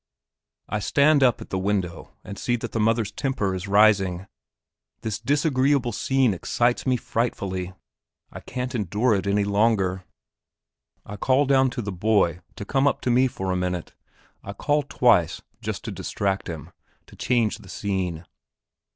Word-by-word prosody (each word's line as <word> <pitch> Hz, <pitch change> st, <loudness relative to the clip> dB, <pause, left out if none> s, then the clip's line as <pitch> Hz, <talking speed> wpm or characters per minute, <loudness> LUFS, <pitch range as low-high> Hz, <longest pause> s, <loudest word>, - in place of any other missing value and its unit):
I 105 Hz, -, -2 dB
stand 145 Hz, +7 st, +3 dB
up 125 Hz, -3 st, +3 dB
in -, -, -8 dB
the 95 Hz, -, -1 dB
window 95 Hz, -3 st, -2 dB
and 100 Hz, -1 st, -8 dB
see 120 Hz, -, 0 dB
that 115 Hz, -, -5 dB
the 115 Hz, -, -2 dB
mother's 110 Hz, -1 st, +1 dB
temper 105 Hz, -6 st, -1 dB
is 95 Hz, +1 st, -5 dB
rising; 100 Hz, -3 st, +3 dB, 0.8 s
this 110 Hz, -1 st, -3 dB
disagreeable 140 Hz, -3 st, +1 dB
scene 130 Hz, 0 st, +1 dB
excites 120 Hz, +8 st, 0 dB
me 130 Hz, -1 st, +3 dB
frightfully. 95 Hz, -6 st, -3 dB, 0.6 s
I -, -, -8 dB
can't 125 Hz, 0 st, -5 dB
endure 110 Hz, +2 st, +1 dB
it 100 Hz, 0 st, -1 dB
any 100 Hz, +1 st, +2 dB
longer. 100 Hz, -3 st, +1 dB, 1.0 s
I 105 Hz, -, -8 dB
call 130 Hz, +7 st, +2 dB
down 135 Hz, -1 st, +4 dB
to 120 Hz, -, -2 dB
the 100 Hz, -, -4 dB
boy 95 Hz, -2 st, +1 dB, 0.2 s
to 100 Hz, -, -7 dB
come 135 Hz, +5 st, +2 dB
up -, -, 0 dB
to 125 Hz, -, 0 dB
me 130 Hz, +2 st, +4 dB
for 95 Hz, -6 st, -4 dB
a -, -, 0 dB
minute; 90 Hz, -1 st, -3 dB, 0.5 s
I 100 Hz, -, -6 dB
call 145 Hz, +8 st, +1 dB
twice, 120 Hz, -, +2 dB, 0.2 s
just -, -, -4 dB
to -, -, -4 dB
distract 100 Hz, -1 st, -2 dB
them 80 Hz, -5 st, -7 dB, 0.3 s
to -, -, -16 dB
change 120 Hz, -4 st, 0 dB
the 95 Hz, -, -15 dB
scene. 90 Hz, -5 st, -3 dB
105 Hz, 160 wpm, -24 LUFS, 95-125 Hz, 1.0 s, down